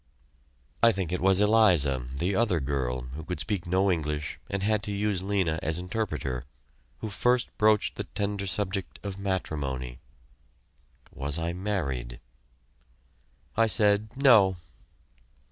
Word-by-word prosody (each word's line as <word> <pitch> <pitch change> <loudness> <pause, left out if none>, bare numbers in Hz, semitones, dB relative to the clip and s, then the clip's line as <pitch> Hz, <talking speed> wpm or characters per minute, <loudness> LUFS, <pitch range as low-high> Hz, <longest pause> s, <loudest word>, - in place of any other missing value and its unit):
I 115 - +7
think 95 -5 -3
it 90 - -2
was 95 +1 +4
Eliza, 90 - +4
the 85 +9 -1
other 105 -6 +2
girl, 65 -3 -2
who 80 +3 -6
could 90 0 -5
speak 85 +2 -1
no 95 +2 +2
English 75 -3 -2
and 100 0 -2
had 105 0 +2
to 105 - -4
use 100 -2 -1
Lena 95 -5 0
as 80 +1 -1
interpreter, 90 - -3 0.6
who 110 - -3
first 125 +5 +1
broached 105 -1 +3
the - - -3
tender 100 -1 -3
subject 95 0 -2
of 100 -1 -5
matrimony. 70 -10 -3 1.1
Was 70 +2 -1
I 85 +1 -2
married? 70 -12 -3 1.4
I 115 0 +4
said, 105 +1 +1
"No." 110 -9 +6
95 Hz, 130 wpm, -27 LUFS, 75-105 Hz, 1.4 s, I